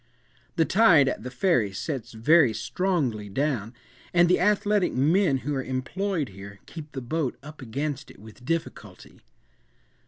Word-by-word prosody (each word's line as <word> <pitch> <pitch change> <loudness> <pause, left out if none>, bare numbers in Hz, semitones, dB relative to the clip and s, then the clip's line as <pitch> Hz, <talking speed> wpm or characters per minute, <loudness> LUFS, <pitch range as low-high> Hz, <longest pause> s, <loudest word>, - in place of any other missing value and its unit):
The 165 -2 +3
tide 175 -9 +5
at - - -2
the 125 - -6
Ferry 130 - +1
sets 120 +2 -5
very 135 +3 +4
strongly 125 - -1
down, 120 -1 -2 0.4
and 175 0 +6
the 180 - +3
athletic 205 +1 +2
men 155 +3 +2
who 145 - -1
are 135 -1 -2
employed 150 +5 -2
here, 100 +1 -11
keep 155 -2 -10
the 135 - -5
boat 140 +2 -2
up 150 0 -11
against 140 +4 -4
it - - -15
with 110 +4 -15
difficulty. 165 +4 -5
145 Hz, 150 wpm, -26 LUFS, 120-170 Hz, 0.4 s, and